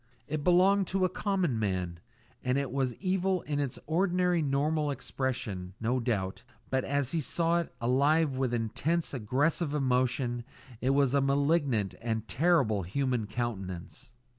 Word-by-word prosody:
It 150 0 -3
belonged 185 +3 +4
to 190 -1 +1
a - - +1
common 185 - 0
man, 90 -5 -2 0.4
and 125 +1 +1
it 140 -3 -1
was 130 -2 -1
evil 190 -1 0
in 145 -1 -2
its 140 -4 -2
ordinary 180 +1 +2
normal 150 +2 +1
expression, 115 -10 -3
no 120 +3 0
doubt, 105 -6 -2 0.3
but 130 -1 +1
as 140 -2 -1
he 165 - 0
saw 170 +4 +1
it, 170 - -4
alive 140 +5 +2
with 130 -2 0
intense, 140 +10 -1
aggressive 145 +6 0
emotion, 125 -2 +1 0.4
it 130 - +1
was 135 -1 +3
a 140 - +4
malignant 140 - +1
and 110 -1 -2
terrible 135 - +2
human 120 +4 -1
countenance. 105 +1 -5
135 Hz, 145 wpm, -30 LUFS, 120-160 Hz, 0.4 s, belonged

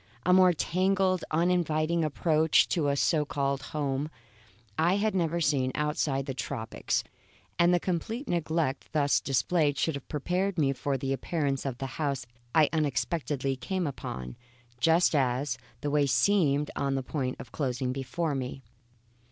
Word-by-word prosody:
A 180 - +5
more 185 -1 +7
tangled, 185 +2 +1
uninviting 165 -1 +1
approach 155 +1 +3
to 160 -5 +1
a 140 - +2
so 150 +2 +2
called 140 -2 -1
home, 140 +1 -2 0.7
I 170 - +3
had 210 +1 +1
never 170 -2 0
seen 140 -5 +1
outside 150 -2 0
of - - -8
the 135 - -3
tropics; 115 -3 -2 0.6
and 175 +1 +5
the 175 - +4
complete 220 - -3
neglect 160 -5 -1
thus 145 -2 +3
displayed 145 +2 +1
should 160 - +1
have 140 -2 -7
prepared 180 +6 -1
me 140 -3 +2
for 135 +1 -2
the 135 +1 -2
appearance 140 -2 -1
of 125 -3 -4
the 135 - -4 0.2
house 140 -3 -1 0.3
I 155 -2 +6
unexpectedly 140 -1 -1
came 185 +7 -2
upon, 65 - -6 0.4
just 165 +7 +4
as, 130 -1 0 0.2
the 145 -1 -2
way 145 -1 +3
seemed 145 +2 +2
on 140 -1 0
the 135 - -2
point 130 -2 -2
of 125 - -10
closing 130 -3 -2
up - - -1
before 140 +4 -2
me. 135 0 -4
150 Hz, 160 wpm, -29 LUFS, 135-170 Hz, 0.7 s, more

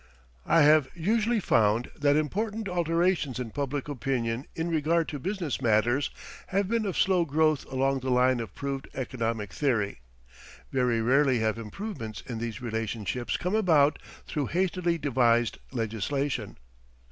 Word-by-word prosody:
I 165 - +5
have 150 -2 +5
usually 220 +6 +1
found 115 - +2
that 145 0 +2
important 210 +8 -1
alterations 170 -5 +1
in 120 -3 -4
public 140 +1 -3
opinion 125 -3 -2
in 165 +1 -2
regard 165 0 +1
to 145 - -5
business 180 - -3
matters 120 +5 +2 0.4
have 195 +1 0
been 225 0 0
of 190 - -3
slow 185 -3 +3
growth 155 -1 +1
along 135 +1 +1
the 130 0 -4
line 125 0 +3
of 110 -5 -6
proved 140 -1 -4
economic 115 -5 -3
theory 115 - 0 0.7
very 125 -3 +1
rarely 135 +1 +3
have 110 0 0
improvements 115 - -6
in 115 -3 -5
these 115 +1 -5
relationships 115 +1 -2
come 180 +2 -2
about 160 -9 +4 0.3
through 145 -4 -2
hastily 175 -1 0
devised 120 -6 +2
legislation. 120 +1 -2
140 Hz, 140 wpm, -28 LUFS, 115-165 Hz, 0.7 s, I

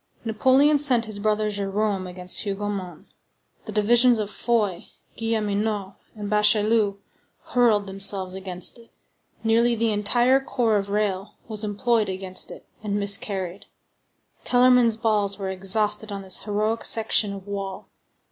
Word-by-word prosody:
Napoleon 265 +7 +3
sent 255 -5 +4
his 215 -2 -6
brother 215 0 0
Jérôme 200 -1 -2
against 180 0 -2
Hougomont; 195 -4 -5 0.6
the - - -7
divisions 235 +3 +4
of 210 -1 -3
Foy, 210 -8 -1 0.3
Guilleminot, 210 -3 -2 0.2
and 210 -1 -6
Bachelu 210 0 +2 0.5
hurled 230 -5 +2
themselves 195 -1 +4
against 185 +2 -6
it; 230 - -18 0.5
nearly 230 +1 +2
the 225 0 0
entire 240 +5 +2
corps 240 -5 0
of 200 0 -4
Reille 200 -1 -2
was 215 -1 -4
employed 215 +1 0
against 185 0 -2
it, - - -11 0.2
and 205 -1 -2
miscarried; 200 -2 -1 0.8
Kellermann's 245 -2 +4
balls 210 -3 0
were 195 -2 -4
exhausted 210 +3 0
on 200 -1 -6
this 190 -1 -2
heroic 215 +2 -1
section 220 -2 +2
of 195 0 -9
wall. 195 -1 -6
210 Hz, 130 wpm, -23 LUFS, 195-225 Hz, 0.8 s, sent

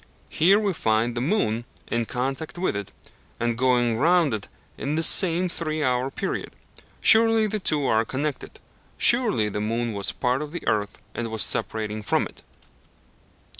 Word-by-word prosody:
Here 190 +6 +4
we 205 -3 0
find 110 -4 0
the 120 - -3
moon 125 - 0 0.2
in 115 -1 -2
contact 135 +6 -4
with 180 - -1
it, 100 -1 -5 0.5
and 120 0 -1
going 120 -2 +1
round 165 -3 +3
it 105 -2 -4 0.3
in 145 +2 -3
this 160 0 +3
same 180 +1 +5
three 155 -3 -2
hour 125 0 0
period. 195 +8 -5 0.5
Surely 225 -1 +5
the 215 0 -2
two 150 -6 0
are 110 -2 +2
connected. 140 +5 -5 0.4
Surely 230 - +3
the 105 0 -4
moon 115 +2 -2
was 100 -1 -2
a - - -6
part 125 +2 0
of 150 +1 -7
the 175 - -7
earth, 105 -1 -1 0.2
and 120 - -4
was 110 -1 +2
separating 110 -1 -1
from 105 - 0
it. - - -13
130 Hz, 170 wpm, -24 LUFS, 110-170 Hz, 0.5 s, same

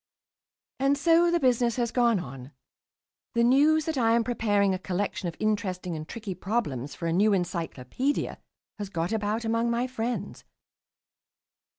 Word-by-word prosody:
And 275 +1 +2
so 335 +4 +4
the 345 0 +2
business 245 -4 +2
has 235 -2 -1
gone 235 -5 +3
on. 135 -2 -9 0.8
The 235 - +3
news 295 +5 +4
that 315 -4 -1
I 230 -1 +4
am 235 - +3
preparing 205 -4 +1
a 185 - -2
collection 185 0 -2
of 165 - -5
interesting 185 -5 -1
and 155 0 -7
tricky 215 -4 -5
problems 150 - -3
for 170 - -6
a 165 - 0
new 205 +4 +4
"Encyclopaedia" 175 - -2 0.4
has 205 -2 -4
got 170 0 -2
about 220 +1 -1
among 230 +1 +1
my 235 +1 0
friends. 245 -1 -4
220 Hz, 155 wpm, -27 LUFS, 180-245 Hz, 0.8 s, so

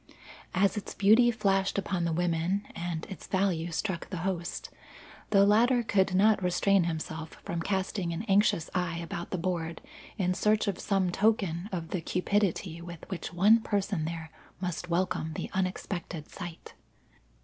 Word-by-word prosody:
As 200 +3 +3
its 210 - -5
beauty 220 +5 +6
flashed 195 -5 +1
upon 190 -3 -1
the 170 - 0
women, 175 +3 0
and 170 -2 -4
its 190 - -9
value 185 -4 0
struck 180 0 -2
the 180 -2 -4
host, 175 -3 -3 0.6
the 200 -1 +6
latter 235 +4 +4
could 190 -4 +2
not 210 +2 +4
restrain 180 +1 +3
himself 160 -1 -4
from 170 -1 -2
casting 190 -1 -1
an 170 +5 -3
anxious 200 -6 +3
eye 180 -2 -1
about 170 0 -5
the 185 - -2
board 170 -2 -2 0.4
in 185 -3 +1
search 210 +3 +2
of 195 -3 -1
some 195 -3 +1
token 195 -3 +1
of 170 -3 -4
the 185 - -2
cupidity 180 -1 0
with 170 -1 -9
which 185 - -4
one 205 +6 +5
person 200 -6 -1
there 165 -1 -5 0.3
must 180 -1 -4
welcome 170 -2 0
this - - -4
unexpected 185 -3 -3
sight. 175 -3 -8
185 Hz, 155 wpm, -29 LUFS, 170-200 Hz, 0.6 s, beauty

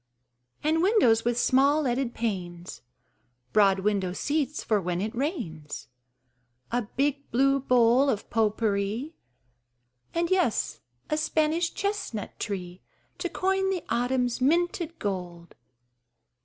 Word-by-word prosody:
And 315 +2 +2
windows 350 - +4
with 240 0 0
small 280 +5 +3
leaded 250 -1 -1
panes, 175 - -4 0.7
Broad 195 -2 +4
window 195 -3 0
seats 290 +5 -1
for 210 -3 +1
when 175 -1 -2
it 215 +3 -2
rains; 220 - -4 0.8
A 245 +1 +1
big 280 +1 0
blue 275 +3 +3
bowl 250 +1 +4
of 215 -5 -1
pot 220 -2 +1
pourri 215 +7 -1 1.0
And 335 +1 -1
yes, 360 - +1 0.3
a 305 - +2
Spanish 315 +2 +1
chestnut 395 - -3
tree 185 -3 -5 0.4
To 355 - -2
coin 385 +2 0
the 375 -3 -2
autumn's 245 +1 0
minted 340 +3 +1
gold. 180 -4 -5
245 Hz, 115 wpm, -27 LUFS, 205-310 Hz, 1.0 s, windows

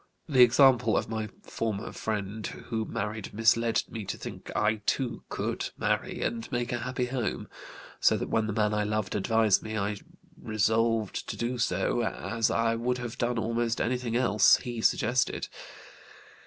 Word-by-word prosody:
The 135 -5 +4
example 125 -2 +6
of - - -1
my 110 -1 -3
former 110 -2 -3
friend 105 0 -3
who 110 -2 -4
married 105 0 -4
misled 115 +1 +3
me 110 -2 -6
to 95 - -4
think - - -8
I 110 +1 +2
too 120 -4 0
could - - -2
marry - - -1
and 115 -1 -3
make 120 0 -1
a 120 - -1
happy 125 +1 -2
home; 125 -2 -3 0.5
so - - +4
that - - -3
when 110 -1 +1
the 110 - -2
man 105 0 +1
I 105 0 +1
loved 105 -1 -1
advised 110 0 +3
me 110 0 -4
I 105 0 -1 0.4
resolved 110 0 0
to - - -4
do 120 +1 -2
so, 95 +2 +1
as 110 +1 -1
I 115 0 +2
would 120 +2 -1
have 120 -2 -6
done 120 0 0
almost 115 +1 0
anything 125 -1 -1
else 120 -4 +5
he 120 -3 -5
suggested. 125 +3 +1
115 Hz, 165 wpm, -28 LUFS, 110-120 Hz, 0.5 s, example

